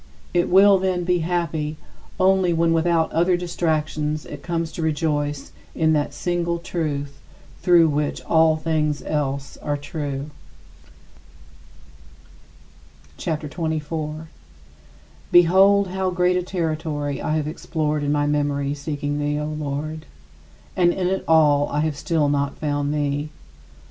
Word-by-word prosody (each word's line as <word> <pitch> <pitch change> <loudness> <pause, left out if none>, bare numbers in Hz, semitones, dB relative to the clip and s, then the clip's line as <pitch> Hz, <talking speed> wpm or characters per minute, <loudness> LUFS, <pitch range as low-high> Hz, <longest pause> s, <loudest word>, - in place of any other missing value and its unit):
It 175 -1 +2
will, 195 +1 +6
then, 185 -1 0
be 180 0 +1
happy 160 -3 -2 0.4
only 190 -1 +3
when 165 0 +2
without 165 0 +2
other 175 +2 +2
distractions 155 -3 -2
it 145 -1 -9
comes 165 -1 -2
to 170 - -6
rejoice 145 -2 -1 0.2
in 160 -1 +2
that 150 -1 0
single 170 -1 -1
Truth 150 -5 -4 0.4
through 175 -2 +5
which 150 -1 -1
all 160 -1 +3
things 155 -2 -1
else 140 -2 -3
are 145 -1 -2
true. 145 -1 -5 2.9
CHAPTER 155 -2 -3
XXIV 145 - -13 0.6
35. 160 +1 -9 1.0
Behold 190 +3 +5
how 190 0 -1
great 180 0 +2
a 180 - +1
territory 155 -5 -3
I 155 - -1
have 150 -1 -2
explored 155 -1 -2
in 145 0 0
my 145 0 +1
memory 145 -1 0
seeking 145 0 -3
thee, 145 0 -1
O 150 - -2
Lord! 155 +1 -4 0.7
And 175 -1 +4
in 185 +1 -2
it 190 0 -1
all 150 -3 +4
I 150 - 0
have 155 -1 -1
still 155 0 0
not 140 -1 -1
found 145 -1 -1
thee. 145 0 -1
155 Hz, 135 wpm, -22 LUFS, 145-175 Hz, 2.9 s, will